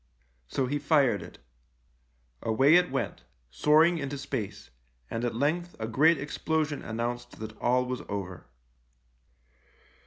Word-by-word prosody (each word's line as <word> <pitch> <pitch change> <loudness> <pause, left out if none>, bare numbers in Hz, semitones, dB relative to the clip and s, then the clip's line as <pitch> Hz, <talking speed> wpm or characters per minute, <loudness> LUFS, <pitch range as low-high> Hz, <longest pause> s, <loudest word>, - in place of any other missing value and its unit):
So 135 - -1
he 145 +3 -1
fired 145 -3 +3
it. - - -11 1.0
Away 135 +7 +4
it 180 +1 +5
went, 125 -9 -3 0.3
soaring 160 - +4
into 140 -1 -4
space, 105 - -5 0.4
and 115 - -2
at 120 -2 -1
length 165 +7 0
a 110 - -3
great 150 +8 +4
explosion 150 +1 -1
announced 120 +2 -4
that 110 0 -7
all 125 +1 +2
was 125 0 -3
over. 95 -6 -5
130 Hz, 125 wpm, -28 LUFS, 115-150 Hz, 1.0 s, it